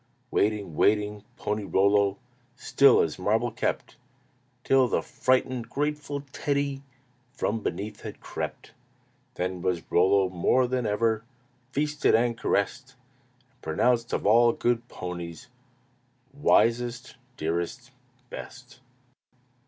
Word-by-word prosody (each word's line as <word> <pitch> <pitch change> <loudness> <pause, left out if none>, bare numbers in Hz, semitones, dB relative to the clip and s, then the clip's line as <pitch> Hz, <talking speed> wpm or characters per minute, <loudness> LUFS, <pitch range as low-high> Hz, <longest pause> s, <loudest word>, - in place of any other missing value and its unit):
Waiting, 100 -5 0
waiting, 105 +2 +1
Pony 105 0 -2
Rollo 100 0 +2 0.4
Still 140 0 +5
as 80 +1 -2
marble 110 +5 +1
kept, - - -3 0.7
Till 135 -1 +4
the - - 0
frightened, 130 -2 0
grateful 145 0 -2
Teddy 140 -1 -1 0.5
From 115 -4 -1
beneath 100 +5 -4
had - - -8
crept. - - -6 0.6
Then 90 0 -3
was 90 -2 -1
Rollo 95 +2 +4
more 95 +8 +2
than 125 -2 -1
ever 110 +1 +1 0.5
Feasted 150 +2 +1
and 115 +1 +2
caressed, 125 +5 -1 0.6
And 130 - -37
pronounced 115 +9 +1
of - - -2
all 115 +3 +5
good 120 0 0
ponies 85 +2 -7 0.8
Wisest, 120 -3 +1 0.2
dearest, 85 +11 -3 0.4
best. 125 0 -10
115 Hz, 105 wpm, -27 LUFS, 100-130 Hz, 0.8 s, Still